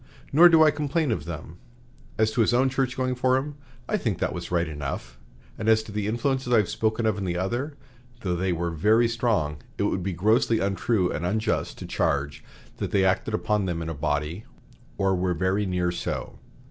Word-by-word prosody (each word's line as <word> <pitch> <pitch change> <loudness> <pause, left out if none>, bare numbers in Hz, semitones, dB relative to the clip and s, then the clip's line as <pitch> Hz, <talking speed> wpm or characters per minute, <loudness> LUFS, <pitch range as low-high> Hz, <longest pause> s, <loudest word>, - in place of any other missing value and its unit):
Nor 170 +5 +8
do 165 -2 +6
I 155 - +6
complain 150 0 -1
of 80 -9 -2
them. 80 0 -7 0.6
As 110 0 +2
to 120 - +1
his 115 +2 +3
own 130 +2 +3
church 130 -1 -1
going 130 -1 0
for 130 +1 +2
him, 145 +3 -3 0.3
I 215 - +1
think 110 - -1
that - - -1
was 90 -1 -6
right 85 -1 +1
enough, 75 -3 -6 0.4
and 110 0 0
as 110 0 +4
to 110 - -10
the 105 0 -2
influences 125 +3 -1
I 120 - +6
have 105 -5 +2
spoken 110 +1 0
of 105 -2 +1
in - - -3
the 90 -2 -2
other, 120 - -2 0.4
though 90 -4 -1
they 95 +1 0
were 85 0 -1
very 110 +9 +3
strong, 110 - 0 0.2
it - - 0
would 95 - 0
be 95 +1 -2
grossly 110 +6 +2
untrue 100 -1 0
and 80 - -3
unjust 110 +4 -1
to - - -7
charge 70 +1 -1 0.3
that - - -3
they 95 -1 +2
acted 95 +3 +1
upon 105 -2 0
them 85 -2 -2
in 80 0 -4
a - - -3
body, 75 +6 -2 0.5
or 95 -1 +2
were 90 -1 0
very 95 +3 0
near 90 -1 0
so. 85 - -4
105 Hz, 210 wpm, -25 LUFS, 90-120 Hz, 0.6 s, Nor